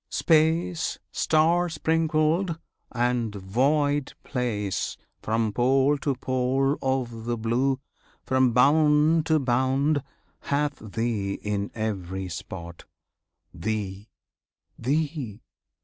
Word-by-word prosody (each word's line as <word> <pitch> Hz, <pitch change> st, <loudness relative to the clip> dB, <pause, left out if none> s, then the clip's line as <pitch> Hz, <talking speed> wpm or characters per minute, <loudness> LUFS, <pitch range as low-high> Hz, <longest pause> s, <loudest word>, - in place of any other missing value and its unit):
Space 165 Hz, +1 st, +2 dB
Star 170 Hz, +3 st, +2 dB
sprinkled, 160 Hz, +2 st, +1 dB, 0.3 s
and 120 Hz, -3 st, 0 dB
void 140 Hz, +8 st, +1 dB
place 110 Hz, -7 st, -2 dB, 0.2 s
From 110 Hz, -1 st, 0 dB
pole 135 Hz, +5 st, +3 dB
to 140 Hz, -1 st, -1 dB
pole 130 Hz, +2 st, +1 dB
of 125 Hz, -4 st, -2 dB
the 120 Hz, 0 st, -1 dB
Blue, 125 Hz, +4 st, 0 dB, 0.4 s
from 130 Hz, -1 st, +3 dB
bound 150 Hz, +5 st, +4 dB
to 160 Hz, -, +4 dB
bound, 135 Hz, +3 st, +1 dB, 0.4 s
Hath 145 Hz, 0 st, -1 dB
Thee 110 Hz, -2 st, -2 dB
in 100 Hz, -1 st, -2 dB
every 95 Hz, -4 st, -3 dB
spot, 85 Hz, -1 st, -8 dB, 0.7 s
Thee, 100 Hz, +1 st, -4 dB, 0.7 s
Thee! 140 Hz, -4 st, -2 dB
130 Hz, 90 wpm, -26 LUFS, 110-150 Hz, 0.7 s, bound